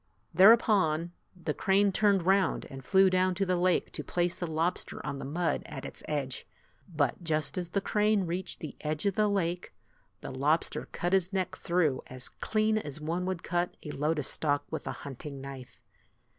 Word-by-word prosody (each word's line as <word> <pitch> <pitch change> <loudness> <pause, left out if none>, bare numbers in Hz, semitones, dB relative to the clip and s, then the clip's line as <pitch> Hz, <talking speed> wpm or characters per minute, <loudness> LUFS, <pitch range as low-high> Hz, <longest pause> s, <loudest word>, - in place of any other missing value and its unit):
Thereupon, 185 -4 +5 0.2
the 165 -4 -3
crane 195 +3 +3
turned 195 -2 +2
round 195 +1 +2
and 135 -1 -8
flew 190 +9 +5
down 185 0 +2
to 195 +2 0
the 185 -1 +1
lake 180 0 +1
to - - -4
place 175 0 0
the 175 - -3
lobster 165 +3 -1
on 140 - -3
the - - -6
mud 165 +5 -1
at - - -7
its - - -6
edge. 140 -4 -3 0.4
But 150 -1 -1
just 155 -3 +2
as 180 -2 -3
the 200 +3 0
crane 210 -2 +2
reached 175 +2 -4
the 155 - -6
edge 150 +2 -2
of 200 - +2
the 210 +2 +2
lake, 180 -3 -1 0.5
the - - -6
lobster 145 +5 0
cut 175 +2 -2
his 190 -1 +2
neck 185 -1 -1
through 170 -8 +1
as 130 0 0
clean 215 0 0
as 150 -7 -7
one 170 +4 -2
would 185 -3 -3
cut 175 0 -1
a 150 - -5
lotus 150 -1 -1
stalk 145 -2 0
with - - -4
a - - -1
hunting 140 +1 -7
knife. 135 -2 -9
175 Hz, 185 wpm, -30 LUFS, 150-190 Hz, 0.5 s, Thereupon